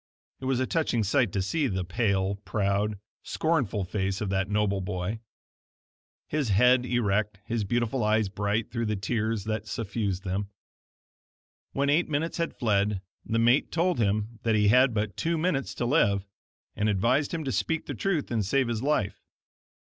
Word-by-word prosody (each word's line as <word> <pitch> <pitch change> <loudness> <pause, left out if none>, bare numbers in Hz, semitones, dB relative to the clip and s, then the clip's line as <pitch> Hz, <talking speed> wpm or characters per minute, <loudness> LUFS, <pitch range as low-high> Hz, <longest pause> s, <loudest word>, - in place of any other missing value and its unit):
It 130 - -7
was 130 -1 +1
a 130 - +1
touching 130 -7 0
sight 115 0 +2
to 95 - 0
see 150 - 0
the 95 -5 -2
pale, 100 0 0
proud, 100 0 -1 0.2
scornful 140 - 0
face 95 +1 -2
of 105 -3 -2
that 95 0 0
noble 105 -2 +1
boy; 90 +4 -3 1.1
his 145 -5 -1
head 125 +5 +4
erect, 105 -3 0
his 115 -2 -1
beautiful 120 +3 0
eyes 110 0 +2
bright 105 +3 -1
through 115 -2 -2
the 105 - 0
tears 110 +1 -1
that 110 0 -3
suffused 100 -3 -2
them. 100 +1 -2 1.2
When 140 +1 +1
eight 165 +4 +2
minutes 155 +3 -1
had 170 0 -2
fled 100 -4 +1 0.2
the 115 - -1
mate 120 +4 +3
told 175 -3 +1
him 105 +2 0
that 115 -1 +1
he 105 -1 +4
had 125 +1 +5
but 105 -1 -1
two 165 0 0
minutes 155 -4 -1
to 120 - -2
live, 100 -8 +2 0.5
and 105 +1 +1
advised 120 +8 +2
him 165 -2 -2
to 135 - -2
speak 165 +3 -1
the - - -4
truth 175 -10 -1
and 115 -3 +1
save 130 +5 +1
his 115 -2 -2
life. 130 -8 0
110 Hz, 170 wpm, -27 LUFS, 100-130 Hz, 1.2 s, had